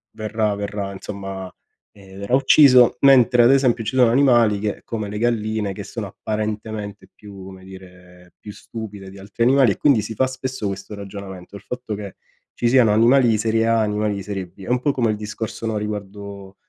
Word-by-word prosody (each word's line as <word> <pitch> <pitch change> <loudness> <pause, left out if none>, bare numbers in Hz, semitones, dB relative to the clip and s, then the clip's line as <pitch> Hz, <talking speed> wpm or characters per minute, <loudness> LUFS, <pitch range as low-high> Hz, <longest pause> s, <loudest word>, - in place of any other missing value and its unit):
Verrà 110 -1 -1
verrà 100 -1 -5
insomma, 95 -1 -7 0.4
ehm, 95 -1 -15
verrà 100 +6 0
ucciso, 130 -3 +6
mentre 125 -3 +5
ad 120 - +6
esempio 130 -4 +2
ci 120 +5 -3
sono 125 -2 +5
animali 120 -5 +3
che, 105 0 -3
come 110 -3 -4
le 105 - -5
galline, 110 -3 -1
che - - -7
sono - - -6
apparentemente 105 -1 -5
più, 100 -2 -12
come 95 0 -12
dire, 90 -1 -15
più 105 - -10
stupide 105 -3 -9
di 100 +1 -13
altri 100 +4 -4
animali 130 -2 +4
e - - -14
quindi 135 -7 +3
si 110 +2 -6
fa 130 - +2
spesso 130 -3 -5
questo 100 +2 -6
ragionamento, 100 -1 -9
il 100 - -17
fatto 125 -3 -6
che 100 -2 -8 0.4
ci 120 - 0
siano 120 -4 +4
animali 120 +4 +4
di 110 -2 +2
serie 110 +1 0
A, 115 0 +2
animali 105 0 -1
di 100 - -6
serie 95 -2 -5
B. 95 +2 -16
È - - -8
un 125 0 +2
po' 140 +3 0
come 120 -4 0
il 105 - -3
discorso, 110 +2 -6
no, 110 -1 -2
riguardo 100 -2 -7
105 Hz, 200 wpm, -21 LUFS, 100-120 Hz, 0.4 s, ucciso